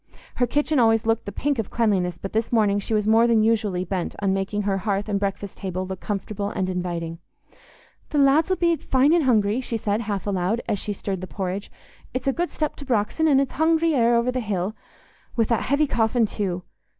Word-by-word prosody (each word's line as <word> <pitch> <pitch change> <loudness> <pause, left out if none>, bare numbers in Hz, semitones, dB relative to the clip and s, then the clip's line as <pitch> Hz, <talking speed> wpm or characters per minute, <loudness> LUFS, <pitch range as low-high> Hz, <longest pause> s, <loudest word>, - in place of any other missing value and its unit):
Her 245 - +2
kitchen 295 +3 +1
always 225 -2 +3
looked 225 0 +1
the 200 - -5
pink 285 +1 -1
of 220 - -2
cleanliness, 190 -7 +1
but 195 - -7
this 225 +1 0
morning 210 -3 +3
she 215 +2 -1
was 210 -1 +1
more 225 +2 +5
than 225 -2 +4
usually 210 -5 +1
bent 185 -1 -3
on 195 -1 0
making 195 +2 -1
her 195 -1 0
hearth 200 +1 -1
and 205 -2 0
breakfast 200 0 -4
table 185 -1 -3
look 190 -1 -6
comfortable 205 0 -3
and 190 -3 -2
inviting. 170 -2 -3 0.9
"The 300 - -2
lads 285 +4 +4
'ull 375 - +2
be 340 -2 +2
fine 270 +3 +2
an' 345 - +4
hungry," 225 -3 +2
she 235 -2 -3
said, 210 0 -1
half 205 -3 -3
aloud, 195 +2 0
as 205 - 0
she 210 - -3
stirred 195 -2 -4
the 185 - -6
porridge. 190 +1 -4 0.4
"It's 255 +1 -3
a 270 - +3
good 345 +3 -1
step 305 -1 -2
to 285 - -9
Brox'on, 245 +6 +1
an' 275 -3 +5
it's 275 -1 -1
hungry 320 +1 +2
air 240 -3 +3
o'er 235 +2 +2
the 255 - -2
hill—wi' 215 +2 -4
that 230 0 +1
heavy 285 +3 +2
coffin 230 -2 +2
too. 185 -4 -3
215 Hz, 215 wpm, -24 LUFS, 195-250 Hz, 0.9 s, more